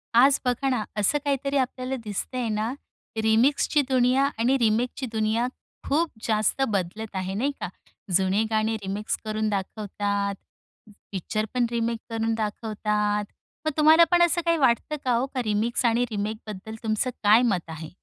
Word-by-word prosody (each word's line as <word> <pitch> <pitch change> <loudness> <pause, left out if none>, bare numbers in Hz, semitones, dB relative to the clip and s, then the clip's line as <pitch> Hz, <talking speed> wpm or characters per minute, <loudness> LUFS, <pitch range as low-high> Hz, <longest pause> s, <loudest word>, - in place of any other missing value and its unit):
आज 270 +3 +6
बघा 250 +2 +1
ना, 250 -5 0
असं 210 +8 +2
काहीतरी 280 -1 0
आपल्याला 255 0 -1
दिसतंय 230 +4 -3
ना 215 +3 -1 0.5
रिमिक्सची 255 +7 +3
दुनिया 255 +1 +3 0.2
आणि 250 +4 +3
रिमेकची 240 +3 +1
दुनिया 220 +2 +1 0.4
खूप 315 +3 +1 0.2
जास्त 215 +4 +1
बदलत 205 +1 -3
आहे 190 0 -2
नाही 255 +8 0
का? - - -3 0.5
जुने 190 +3 +3
गाणे 220 0 +1
रिमिक्स 200 +2 -2
करून 215 0 -1
दाखवतात, 200 0 -2 0.8
पिक्चरपण 215 +5 -1
रिमेक 230 -1 -1
करून 225 0 -1
दाखवतात. 210 -1 -1 0.4
मग 310 - +2
तुम्हाला 315 +2 +7
पण 350 0 +5
असं 345 0 +3
काही 335 0 +3
वाटतं 265 +1 +2
का 255 - +2
हो 240 +2 +2
का 255 - +1
रिमिक्स 220 +4 0
आणि 235 +1 +3
रिमेकबद्दल 215 0 -5
तुमचं 220 +3 0
काय 210 +3 +7
मत 185 -5 +1
आहे? 160 -1 -7
225 Hz, 145 wpm, -25 LUFS, 210-255 Hz, 0.8 s, तुम्हाला